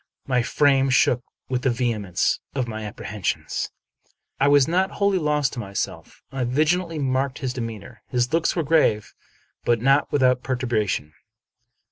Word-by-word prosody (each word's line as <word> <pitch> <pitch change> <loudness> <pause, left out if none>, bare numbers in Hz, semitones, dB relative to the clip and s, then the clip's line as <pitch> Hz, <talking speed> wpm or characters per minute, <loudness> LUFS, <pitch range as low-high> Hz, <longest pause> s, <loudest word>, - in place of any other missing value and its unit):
My 125 -2 +1
frame 135 +2 +3
shook 125 -2 +3 0.3
with 125 -1 -1
the 135 - +2
vehemence 115 -7 0 0.2
of 130 -3 -1
my 110 -1 -5
ap 105 - -8
prehensions. 105 -3 -3 0.4
Yet - - -36 0.3
I 140 - +4
was 145 -2 +5
not 185 +3 +1
wholly 200 -2 +2
lost 150 -3 +1
to - - -5
myself; 100 -3 -5
I 135 -1 -2
vigilantly 155 +7 +1
marked 135 -1 0
his 130 -2 -3
demeanor. 115 -5 -7
His 125 +2 -1
looks 165 0 +2
were 170 - 0
grave, 140 -9 +2 0.5
but 120 -1 +2
not 135 +4 +3
without 130 -3 +3
per 130 - -1
turbation. 110 - -1
130 Hz, 160 wpm, -23 LUFS, 120-145 Hz, 0.5 s, was